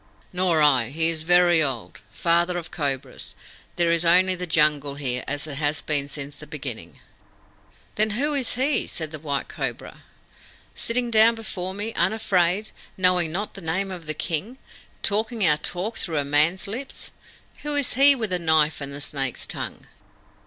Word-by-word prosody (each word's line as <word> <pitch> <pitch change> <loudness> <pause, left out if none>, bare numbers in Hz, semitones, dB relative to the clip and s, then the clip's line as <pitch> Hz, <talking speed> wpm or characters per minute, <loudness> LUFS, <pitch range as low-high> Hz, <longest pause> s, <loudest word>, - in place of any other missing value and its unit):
"Nor 180 -4 +2
I. 135 -5 +5
He 160 +4 +3
is 160 -2 -3
very 175 0 +5
old. 135 -6 -2
Father 175 +1 +1
of 170 -1 -7
Cobras, 140 -4 -4 0.4
there 170 -1 +2
is 170 0 +1
only 180 +2 +5
the 180 0 -5
Jungle 150 -3 +2
here, 125 -3 -3
as 145 +1 -3
it 145 -3 -7
has 150 0 -1
been 145 -2 -1
since 145 0 -8
the 150 - -12
beginning." 125 - -7 1.0
"Then 215 +1 +4
who 295 +3 0
is 265 -5 0
HE," 270 +4 +1
said 160 -2 -5
the 155 - -7
White 140 -2 -2
Cobra, - - -6 0.7
"sitting 240 0 -2
down 225 +1 +6
before 190 -4 -5
me, 210 +3 -4
unafraid, 190 +1 +1 0.3
knowing 180 -3 +3
not 200 +5 -3
the 195 - -9
name 185 +4 -1
of 175 -4 -8
the 155 - -2
King, 180 - -3 0.5
talking 220 +1 0
our 150 -3 +5
talk 180 +8 -4
through 165 -4 -3
a 145 - 0
man's 150 +7 +2
lips? 250 +7 -6 0.5
Who 295 0 -2
is 285 -2 0
he 280 +2 +6
with 220 -6 -3
the 180 - +1
knife 160 -2 +2
and 140 0 -5
the 140 +1 -7
snake's 135 -3 -1
tongue?" - - -5
170 Hz, 175 wpm, -24 LUFS, 150-200 Hz, 1.0 s, down